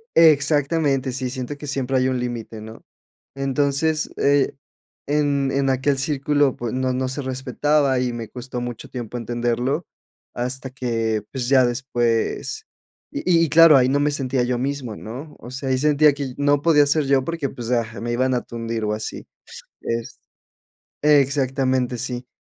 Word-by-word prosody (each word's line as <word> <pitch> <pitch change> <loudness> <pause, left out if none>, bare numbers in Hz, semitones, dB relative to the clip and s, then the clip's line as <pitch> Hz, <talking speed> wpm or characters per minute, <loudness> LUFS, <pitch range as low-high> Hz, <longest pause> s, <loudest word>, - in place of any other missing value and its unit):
E-exactamente. 145 -3 +3
Sí, 130 0 -3
siento 130 +2 -5
que 150 - -8
siempre 135 -1 -1
hay 130 - +2
un 130 -1 0
límite, 115 -3 -5
¿no? 110 +1 -11 0.5
Entonces, 140 +3 0
eh, 140 -1 +2 0.5
en 140 -2 +1
en 135 0 +1
aquel 135 +1 +1
círculo, 145 0 +1
pues 120 -1 -4
no 130 0 0
no 130 +1 -1
se 130 +3 -4
respetaba. 130 +1 +1
Y 125 -1 -1
me 115 -2 -6
costó 125 0 -6
mucho 120 -2 -6
tiempo 120 -2 -6
entenderlo, 120 +6 -1 0.5
hasta 130 +2 -2
que 115 -4 -2
pues, 125 -3 -3
ya 130 -2 +5
después 120 -2 -1 0.5
Y - - -4 0.2
y 155 - -4
claro, 165 -2 +8
ahí 130 -1 +4
no 140 +2 +2
me 145 +1 +2
sentía 130 -3 0
yo 120 0 0
mismo, 130 -3 -3
¿no? 135 +10 -8
O 120 - -10
sea, 130 +1 -4
ahí 130 - +2
sentía 150 +1 +4
que 145 0 -5
y 130 - -5
no 145 0 +2
podía 150 -3 +5
ser 150 +1 +2
yo, 135 -1 +3
porque 165 -3 -3
pues, 120 0 -6
ah, 115 -2 -1
me 120 +1 -3
iban 130 +2 +1
a 125 - +1
tundir, 115 -1 -4
o 105 - 0
así. 110 0 -5 0.5
Es 115 0 -4 0.8
Exactamente, 135 -3 +2
sí. 125 +1 -4
130 Hz, 170 wpm, -22 LUFS, 120-145 Hz, 0.8 s, claro